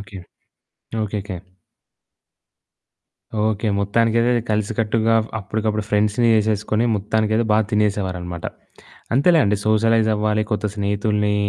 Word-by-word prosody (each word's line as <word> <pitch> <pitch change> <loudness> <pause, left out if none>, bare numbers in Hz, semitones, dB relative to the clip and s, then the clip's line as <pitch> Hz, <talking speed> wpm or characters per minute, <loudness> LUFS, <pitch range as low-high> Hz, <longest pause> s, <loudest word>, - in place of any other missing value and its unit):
Okay. 100 -1 -10 0.9
Okay. 105 0 -3 2.3
Okay. 110 0 0
మొత్తానికైతే 115 +3 +2 0.2
కలిసికట్టుగా 110 +1 0 0.2
అప్పడికప్పుడు 105 +1 -2
ఫ్రెండ్స్‌ని 105 +3 +2
జేసేసుకొని 110 +1 +1
మొత్తానికైతే 110 +2 0
బా 105 - +4
తినేసేవారనమాట. 95 -5 -1 0.7
అంతేలేండి 140 - +4
సోషలైజ్ 110 +1 +3
అవ్వాలి. 105 0 0
కొత్త 105 -1 -2
స్నేహితుల్ని 105 0 0
105 Hz, 85 wpm, -21 LUFS, 105-110 Hz, 2.3 s, బా